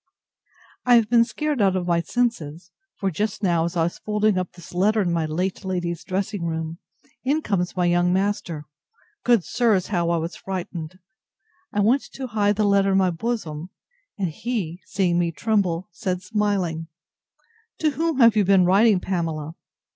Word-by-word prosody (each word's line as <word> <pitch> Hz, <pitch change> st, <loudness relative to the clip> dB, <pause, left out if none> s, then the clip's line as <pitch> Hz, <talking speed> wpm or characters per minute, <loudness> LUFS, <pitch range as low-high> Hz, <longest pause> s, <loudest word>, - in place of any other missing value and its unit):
I 245 Hz, -1 st, +5 dB
have 225 Hz, -1 st, +3 dB
been 235 Hz, -1 st, +6 dB
scared 295 Hz, +1 st, -2 dB
out 195 Hz, -2 st, +3 dB
of 180 Hz, -1 st, -1 dB
my 170 Hz, -1 st, +2 dB
senses; 175 Hz, -5 st, -2 dB, 0.2 s
for 195 Hz, -1 st, -1 dB
just 210 Hz, +4 st, -2 dB
now, 170 Hz, -3 st, +2 dB
as 170 Hz, +1 st, -3 dB
I 165 Hz, -, +3 dB
was 170 Hz, -, -3 dB
folding 210 Hz, -1 st, +1 dB
up 185 Hz, -1 st, -2 dB
this 175 Hz, -, -13 dB
letter 205 Hz, +5 st, +2 dB
in 180 Hz, -4 st, +1 dB
my 165 Hz, -2 st, 0 dB
late 180 Hz, +6 st, -2 dB
lady's 175 Hz, -3 st, -3 dB
dressing 195 Hz, 0 st, -2 dB
room, 160 Hz, 0 st, -3 dB, 0.4 s
in 295 Hz, +4 st, +1 dB
comes 185 Hz, -2 st, -1 dB
my 180 Hz, -, +2 dB
young 175 Hz, 0 st, +3 dB
master! 185 Hz, -5 st, -1 dB, 0.6 s
Good 235 Hz, -6 st, +4 dB
sirs! 220 Hz, -6 st, +1 dB
how 175 Hz, -4 st, 0 dB
was 170 Hz, 0 st, -1 dB
I -, -, -16 dB
frightened! 180 Hz, -2 st, -5 dB, 0.7 s
I 205 Hz, -, 0 dB
went 240 Hz, +7 st, +3 dB
to 265 Hz, -, -5 dB
hide 210 Hz, -3 st, +1 dB
the 215 Hz, -, +1 dB
letter 200 Hz, -1 st, +3 dB
in -, -, +4 dB
my 185 Hz, -2 st, +3 dB
bosom; 170 Hz, -5 st, -4 dB, 0.5 s
and 190 Hz, -4 st, -1 dB
he, 185 Hz, -2 st, -4 dB
seeing 180 Hz, -3 st, +1 dB
me 170 Hz, -1 st, +1 dB
tremble, 185 Hz, 0 st, 0 dB
said, 180 Hz, 0 st, -3 dB
smiling, 185 Hz, -6 st, -1 dB, 0.9 s
To 310 Hz, -1 st, +1 dB
whom 325 Hz, 0 st, -1 dB
have 230 Hz, -2 st, +7 dB
you 210 Hz, -, +4 dB
been 190 Hz, -1 st, +5 dB
writing, 200 Hz, +2 st, +5 dB
Pamela? 165 Hz, -4 st, -3 dB
190 Hz, 175 wpm, -23 LUFS, 170-215 Hz, 0.9 s, have